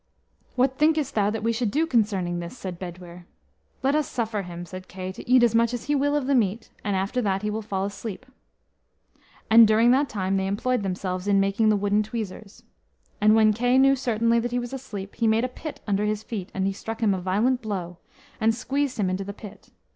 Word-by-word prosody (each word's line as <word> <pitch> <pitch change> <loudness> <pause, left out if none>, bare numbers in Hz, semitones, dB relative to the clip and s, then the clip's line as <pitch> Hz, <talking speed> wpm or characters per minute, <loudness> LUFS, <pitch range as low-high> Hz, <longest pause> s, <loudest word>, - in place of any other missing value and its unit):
"What 260 +1 +1
thinkest 305 -2 +2
thou 205 -1 +2
that 215 0 -3
we 230 +1 +1
should 230 -1 -1
do 305 +9 +1
concerning 200 - 0
this?" 170 +8 -7
said 185 -5 -6
Bedwyr. 175 -1 -9 0.6
"Let 270 +1 +2
us 300 -2 +1
suffer 225 -4 -2
him." 175 -1 -7
said 185 +1 -9
Kay, 185 0 -6
"to 190 - -11
eat 255 -1 +6
as 235 -2 +4
much 230 +1 +2
as 240 - -6
he 295 - -1
will 285 +1 +1
of 290 -3 0
the 280 - +1
meat, 225 -3 0
and 205 -2 -1
after 195 +7 -1
that 195 -2 -1
he 210 - -1
will 220 +1 -3
fall 195 -3 -2
asleep." 200 0 -6 1.2
And 225 0 +8
during 225 +3 +4
that 275 +2 +3
time 195 -1 -1
they 190 0 -1
employed 230 +5 0
themselves 185 0 -3
in 200 -1 +4
making 200 +3 +2
the 215 - +4
wooden 205 +1 +1
tweezers. 215 -2 -6 0.6
And 215 +1 +6
when 215 -1 +5
Kay 245 +4 +2
knew 270 +1 +5
certainly 230 -2 +1
that 240 +1 -2
he 245 - -2
was 245 +1 -4
asleep, 205 -7 -7
he 230 - +2
made 220 +2 +3
a - - 0
pit 300 +4 -8
under 205 0 0
his 210 0 -1
feet, 200 -6 -5
and 190 0 -2
he 195 - 0
struck 225 +3 -7
him 205 -3 +4
a 185 - -3
violent 220 +8 +1
blow, 180 -5 -5 0.4
and 225 0 +2
squeezed 275 +3 -2
him 195 - +2
into 185 +1 -2
the 200 +1 -6
pit. 210 -1 -12
215 Hz, 225 wpm, -25 LUFS, 195-245 Hz, 1.2 s, And